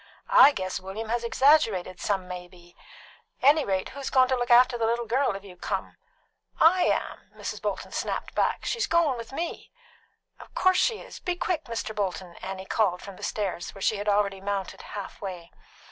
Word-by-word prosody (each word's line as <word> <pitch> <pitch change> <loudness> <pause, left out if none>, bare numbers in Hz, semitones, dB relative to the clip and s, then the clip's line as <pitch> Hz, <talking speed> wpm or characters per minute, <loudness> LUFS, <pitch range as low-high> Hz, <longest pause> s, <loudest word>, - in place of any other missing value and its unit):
"I 290 - +9
guess 185 -8 -3
William 200 +4 -6
has 235 +1 0
exaggerated 225 - +3
some 195 -3 -1
may 180 -1 -7
be. 175 -1 -19 0.7
Anyrate, 270 -10 +3
who's 275 0 -5
goin' 260 -1 +5
to 260 - +3
look 245 0 -2
after 245 +1 +6
the 230 -1 0
little 235 +1 0
girl 255 -1 +1
if 195 - -8
you 190 -3 -12
come?" 180 - -4 0.6
"I 355 +3 +5
am," - - -2
Mrs. - - -6
Bolton - - -3
snapped - - -3
back. - - 0
"She's 460 -4 0
goin' 335 -5 +3
with 230 0 -8
me." 330 +5 -5 0.7
"Of - - -14
course 370 0 +3
she 455 -3 +1
is. - - -11
Be 360 -1 -2
quick, 350 -3 -2
Mr. 230 -1 -4
Bolton!" 185 -3 -3
Annie 190 0 -6
called 190 -4 0
from 200 -2 -9
the - - -14
stairs, 195 -4 -3
which 195 - -7
she 215 - +2
had 205 +1 -2
already 200 -1 +1
mounted 195 -1 -3
half 200 -2 -8
way. 180 -4 -7
210 Hz, 190 wpm, -27 LUFS, 190-265 Hz, 0.7 s, I